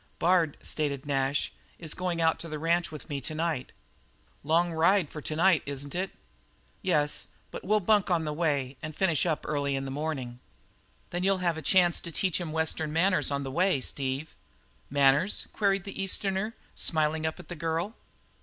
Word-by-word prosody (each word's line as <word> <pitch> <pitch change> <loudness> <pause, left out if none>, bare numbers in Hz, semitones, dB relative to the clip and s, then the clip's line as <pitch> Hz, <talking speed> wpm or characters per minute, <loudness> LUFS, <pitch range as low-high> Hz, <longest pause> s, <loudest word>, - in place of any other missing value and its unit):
"Bard," 170 -4 +3
stated 145 -3 -2
Nash, 140 0 0 0.2
"is 160 -3 -5
going 180 -2 -2
out 160 -1 +3
to 170 - -5
the 155 -1 -4
ranch 170 +2 +1
with 155 - -7
me 140 -2 -3
to 155 - -4
night." 160 -5 -1 0.7
"Long 165 +3 +2
ride 165 +1 +3
for 150 - -6
to 155 - -3
night, 170 -2 +4
isn't 140 0 -4
it?" 185 +2 -1 0.7
"Yes, 150 -5 +1 0.2
but - - -7
we'll 210 +2 +2
bunk 205 +1 +3
on 170 -3 +2
the 150 - -2
way 140 -5 0
and 155 -1 -6
finish 175 -3 +2
up 160 -3 -1
early 140 -2 0
in 135 0 -2
the 135 - -4
morning." 135 -4 -3 0.7
"Then 175 - -2
you'll 195 0 +3
have 170 -2 +2
a 160 - -5
chance 175 0 +4
to 170 - -6
teach 185 +2 +1
him 165 -3 -4
Western 160 -1 0
manners 185 +4 +3
on 140 0 -1
the 135 - -4
way, 180 0 +2
Steve." 135 +3 -3 0.6
"Manners?" 140 +7 +3
queried 195 -2 +1
the 195 0 -5
Easterner, 195 +2 -1 0.2
smiling 155 0 +1
up 160 - -2
to - - -11
the 175 - -8
girl. 165 +5 -2
160 Hz, 185 wpm, -29 LUFS, 145-180 Hz, 0.7 s, night